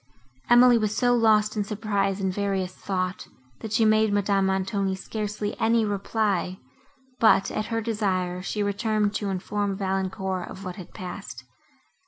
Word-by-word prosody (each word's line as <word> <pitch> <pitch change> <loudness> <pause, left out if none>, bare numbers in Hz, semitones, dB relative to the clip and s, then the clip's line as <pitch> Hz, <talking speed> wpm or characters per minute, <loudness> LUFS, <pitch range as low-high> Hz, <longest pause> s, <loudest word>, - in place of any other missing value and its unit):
Emily 240 0 +7
was 215 -1 -1
so 245 -1 +3
lost 220 -2 +3
in 210 - 0
surprise 200 -2 -1
and 190 -1 -1
various 195 -2 -1
thought, 185 -1 -3 0.3
that 220 - -7
she 220 +1 +3
made 215 0 +4
Madame 200 -1 +2
Montoni 190 0 0
scarcely 210 +1 -4
any 225 0 +3
reply, 200 -2 -1 0.6
but, 220 -3 +4
at 215 - -2
her 225 -1 -1
desire, 185 -5 -1
she 205 +2 -2
returned 210 0 0
to 205 -2 -2
inform 195 +1 -2
Valancourt 190 -1 -2
of 195 - -9
what 180 -1 -6
had 185 - -11
passed. 180 -8 -7
205 Hz, 150 wpm, -25 LUFS, 190-215 Hz, 0.6 s, Emily